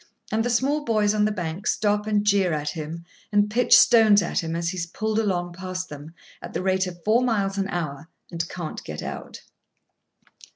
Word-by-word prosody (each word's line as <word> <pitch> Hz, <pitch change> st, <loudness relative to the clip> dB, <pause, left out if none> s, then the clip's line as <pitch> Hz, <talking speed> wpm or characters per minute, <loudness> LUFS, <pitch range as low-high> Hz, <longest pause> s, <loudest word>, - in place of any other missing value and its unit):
And 220 Hz, +1 st, +1 dB
the 245 Hz, -, -1 dB
small 275 Hz, +5 st, +1 dB
boys 215 Hz, -4 st, +2 dB
on 210 Hz, -1 st, +2 dB
the 215 Hz, -, +1 dB
bank 180 Hz, -1 st, -4 dB
stop 210 Hz, 0 st, +1 dB
and 210 Hz, -1 st, +1 dB
jeer 200 Hz, -4 st, +3 dB
at 150 Hz, -1 st, -2 dB
him, 160 Hz, +2 st, -6 dB, 0.3 s
and 205 Hz, 0 st, +2 dB
pitch 245 Hz, +2 st, +6 dB
stones 220 Hz, -4 st, +6 dB
at 195 Hz, -, -1 dB
him 165 Hz, 0 st, -3 dB
as 170 Hz, 0 st, -1 dB
he 185 Hz, -, -5 dB
is 170 Hz, -1 st, -3 dB
pulled 215 Hz, +4 st, -2 dB
along 175 Hz, -5 st, -1 dB
past 185 Hz, 0 st, -5 dB
them, 150 Hz, +3 st, -10 dB, 0.3 s
at -, -, -9 dB
the -, -, -2 dB
rate 190 Hz, 0 st, +1 dB
of 175 Hz, -1 st, -9 dB
four 225 Hz, +3 st, +3 dB
miles 200 Hz, -5 st, 0 dB
an 195 Hz, 0 st, -1 dB
hour, 160 Hz, -3 st, -4 dB, 0.2 s
and 170 Hz, -1 st, -3 dB
can't 170 Hz, -4 st, -6 dB
get 75 Hz, -1 st, -6 dB
out. -, -, -7 dB
195 Hz, 205 wpm, -24 LUFS, 170-215 Hz, 0.3 s, pitch